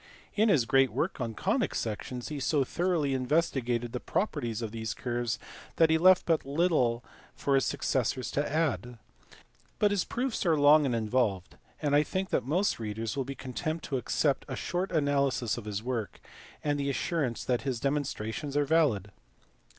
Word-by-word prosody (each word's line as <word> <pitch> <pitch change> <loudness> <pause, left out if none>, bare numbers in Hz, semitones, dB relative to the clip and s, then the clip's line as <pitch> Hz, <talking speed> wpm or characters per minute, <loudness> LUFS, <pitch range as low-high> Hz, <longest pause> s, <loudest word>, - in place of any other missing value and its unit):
In 220 +1 +3
his 145 - +4
great 135 +2 +4
work 140 - -2
on 115 -2 -3
conic - - 0
sections 120 +3 -4
he 150 -2 -4
so 140 +2 +2
thoroughly 165 -1 0
investigated 125 -4 0
the 125 - -2
properties 120 - -2
of 110 - -4
these 110 -1 -4
curves 120 -1 -2 0.4
that 165 -1 +4
he 160 - +4
left 185 +2 +6
but 165 -2 +2
little 140 -6 +1 0.3
for 140 - -1
his 135 -1 +3
successors 130 0 -1
to 145 0 -1
add. 145 -6 -1 0.8
But 205 -1 +3
his 200 -4 +1
proofs 250 0 -2
are 165 -3 +3
long 145 +1 +6
and 125 - 0
involved, 110 -4 0 0.2
and 145 -2 +1
I 145 - +6
think 190 +4 -3
most 170 - 0
readers 110 +2 -3
will 135 -2 -1
be 140 +1 -6
content 155 +6 -4
to 135 - -2
accept 140 +3 0
a - - -4
short 180 +2 -2
analysis 140 -6 +1
of 120 - -7
his 105 0 -4
work, 120 -4 -3 0.4
and 145 -1 0
the 140 0 -1
assurance 140 -3 -1
that 125 -2 +1
his 130 -4 -2
demonstrations 140 0 -2
are 145 - +3
valid. 135 - +2
135 Hz, 175 wpm, -29 LUFS, 120-155 Hz, 0.8 s, left